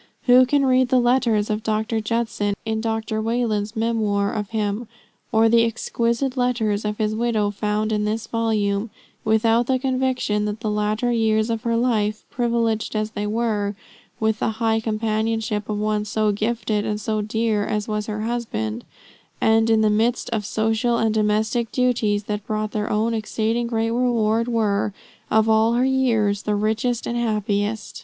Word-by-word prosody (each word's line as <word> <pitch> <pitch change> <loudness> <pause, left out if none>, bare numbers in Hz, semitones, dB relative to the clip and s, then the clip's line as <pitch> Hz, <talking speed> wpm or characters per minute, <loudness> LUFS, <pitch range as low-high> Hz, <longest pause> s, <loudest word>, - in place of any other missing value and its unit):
Who 250 0 +6
can 280 +1 +2
read 255 -1 +3
the 255 - +4
letters 240 -4 +2
of 210 +1 -1
Dr. 220 0 -1
Judson, 215 -2 -1
in 220 0 -1
Dr. 220 -1 -2
Wayland's 220 -2 -1
memoir 215 -3 0
of 210 -2 -3
him, 215 +1 -2 0.4
or 225 0 +4
the 230 +1 +5
exquisite 235 +3 -1
letters 230 -5 0
of 210 0 -2
his 215 -1 0
widow 220 -2 0
found 210 +1 -1
in 210 -1 0
this 215 +1 -2
volume, 215 -2 0 0.3
without 225 +2 +2
the 260 - +2
conviction 255 -5 0
that 210 +1 -4
the 215 -3 -1
latter 210 +3 0
years 220 -1 +1
of 225 -1 -2
her 230 0 0
life, 215 -3 0
privileged 230 -3 0
as 215 0 -1
they 210 -1 -3
were 210 -2 -1 0.4
with 220 0 0
the 220 - 0
high 225 -1 +1
companionship 220 -1 -1
of 210 - -1
one 210 0 0
so 215 0 0
gifted 215 0 -1
and 210 0 -2
so 215 0 -1
dear 215 0 0
as 210 0 -2
was 210 -1 -2
her 215 -1 -3
husband, 120 - -3 0.6
and 225 0 +3
in 220 -1 +4
the 215 - +3
midst 230 +4 0
of 210 -3 -2
social 225 +2 +1
and 225 -1 +1
domestic 220 +2 0
duties 230 -5 +1
that 210 0 -4
brought 215 0 -2
their 210 0 -2
own 220 +2 +1
exceeding 225 +2 -1
great 225 -1 0
reward, 230 -2 +1
were, 210 -3 0 0.4
of 220 0 +3
all 220 +1 +4
her 245 +2 +2
years, 230 -7 +1
the 210 - -1
richest 220 +3 0
and 235 - -3
the 240 - 0
happiest! 210 -1 -1
220 Hz, 170 wpm, -22 LUFS, 210-235 Hz, 0.6 s, Who